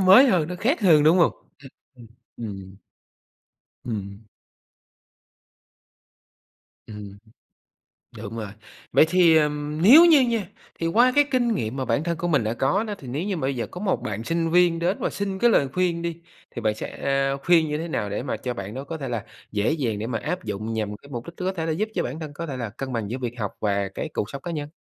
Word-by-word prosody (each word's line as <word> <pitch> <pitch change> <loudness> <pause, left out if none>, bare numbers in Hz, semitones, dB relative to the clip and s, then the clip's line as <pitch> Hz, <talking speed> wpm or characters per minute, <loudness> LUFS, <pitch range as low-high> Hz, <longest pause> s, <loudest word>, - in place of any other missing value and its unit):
mới 190 +9 +8
hơn, 170 -6 +2
nó 180 - -4
khác 245 - 0
hơn, 160 -7 +6
đúng 165 +4 +5
hông? 170 - +4 0.3
Ừm, 140 -1 -13 0.3
ừm, 120 -2 -14 0.4
ừm. 95 -1 -9 1.1
Ừm. 105 -2 -6 2.6
Ừm. 105 -2 -9 1.0
Đúng 110 +1 -7
rồi. 110 -2 -4 0.4
Vậy - - +6
thì, 170 -3 +5
ừm, 150 0 -1
nếu 285 - +9
như 310 -5 +7
nha, 230 -6 0 0.3
thì 165 - 0
qua 240 +8 +4
cái 290 - +6
kinh 240 -3 +2
nghiệm 110 - -3
mà 130 -1 -2
bản 125 +6 0
thân 170 -1 -2
của 175 - -2
mình 145 -9 +2
đã 110 +2 -1
có 140 - +1
đó. 210 -2 -4
Thì 130 - -11
nếu 140 +8 -3
như 200 -2 -2
mà - - -5
bây 135 0 -1
giờ 120 - -3
có 180 - -7
một 195 -3 0
bạn 105 +1 -4
sinh 165 +2 -1
viên 175 -1 +4
đến 180 +4 0
và - - -1
xin 195 -1 -4
cái 240 - +5
lời 140 -10 +3
khuyên 175 -2 0
đi. 170 0 -4 0.3
Thì 120 - -6
bạn 105 -1 +1
sẽ 135 +4 -1
khuyên 165 -2 +4
như 150 0 -2
thế 165 +2 -4
nào 105 -10 -2
để 105 +5 -3
mà 135 - -3
cho 125 -1 -4
bạn 100 -1 -6
đó 135 +2 -5
có 160 +3 -6
thể 135 -4 -5
là 115 -4 -3 0.3
dễ 105 +7 +1
dàng 120 -10 -1
để 110 - -3
mà 115 -3 -2
áp 180 0 -3
dụng 110 +1 -4
nhằm 105 -2 -2
cái 140 - -17
mục 120 -3 -6
đích 170 - -9
có 190 +1 -2
thể 165 -2 -2
giúp 215 +6 -1
cho 175 - 0
bản 145 +6 -5
thân 150 -2 -7
có 170 +3 -5
thể 135 -3 -5
là 115 -4 -4
cân 130 +4 -6
bằng 110 -3 -2
giữa 125 - -3
việc 120 -2 -4
học 100 -2 -2
và 100 -2 0
cái - - -4
cuộc 105 - -2
sống 140 -1 -7
cá 175 - -5
nhân? 150 -2 -4
150 Hz, 230 wpm, -24 LUFS, 115-175 Hz, 2.6 s, nếu